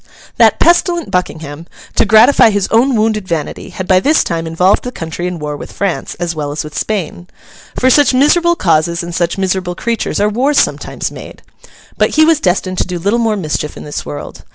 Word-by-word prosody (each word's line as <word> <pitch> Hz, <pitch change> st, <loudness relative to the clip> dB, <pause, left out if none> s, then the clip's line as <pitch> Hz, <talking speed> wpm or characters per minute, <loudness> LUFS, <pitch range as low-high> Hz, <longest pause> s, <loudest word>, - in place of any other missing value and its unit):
That -, -, +4 dB
pestilent 345 Hz, -1 st, +2 dB
Buckingham, 160 Hz, -3 st, -4 dB, 0.3 s
to -, -, +2 dB
gratify 225 Hz, +2 st, +6 dB
his 205 Hz, -2 st, 0 dB
own 245 Hz, +3 st, +3 dB
wounded 215 Hz, -2 st, 0 dB
vanity, 165 Hz, -4 st, -4 dB
had 185 Hz, -, -6 dB
by 185 Hz, -1 st, +4 dB
this 300 Hz, +10 st, +2 dB
time 165 Hz, -1 st, -3 dB
involved 180 Hz, +4 st, +2 dB
the 250 Hz, -, -5 dB
country 165 Hz, -2 st, -5 dB
in 180 Hz, -1 st, -4 dB
war 150 Hz, -1 st, -5 dB
with -, -, -9 dB
France, 195 Hz, -4 st, -3 dB
as 175 Hz, -1 st, -3 dB
well 150 Hz, -3 st, -4 dB
as 150 Hz, -, -4 dB
with 150 Hz, 0 st, -10 dB
Spain. 180 Hz, -4 st, -3 dB, 0.5 s
For 260 Hz, +1 st, +3 dB
such 290 Hz, 0 st, +4 dB
miserable 335 Hz, +6 st, +3 dB
causes 170 Hz, -, +1 dB
and 170 Hz, 0 st, -7 dB
such 170 Hz, +1 st, -1 dB
miserable 185 Hz, -2 st, -2 dB
creatures 230 Hz, +3 st, -2 dB
are 205 Hz, -, +2 dB
wars 260 Hz, +7 st, 0 dB
sometimes -, -, -2 dB
made! -, -, -11 dB, 0.6 s
But -, -, +1 dB
he 310 Hz, 0 st, +5 dB
was 325 Hz, -2 st, +3 dB
destined 185 Hz, 0 st, -1 dB
to -, -, 0 dB
do 180 Hz, -1 st, -4 dB
little 200 Hz, +7 st, 0 dB
more 225 Hz, -2 st, +1 dB
mischief 150 Hz, -4 st, -3 dB
in -, -, -9 dB
this 145 Hz, -, -5 dB
world. 75 Hz, 0 st, -8 dB
185 Hz, 200 wpm, -14 LUFS, 165-235 Hz, 0.6 s, gratify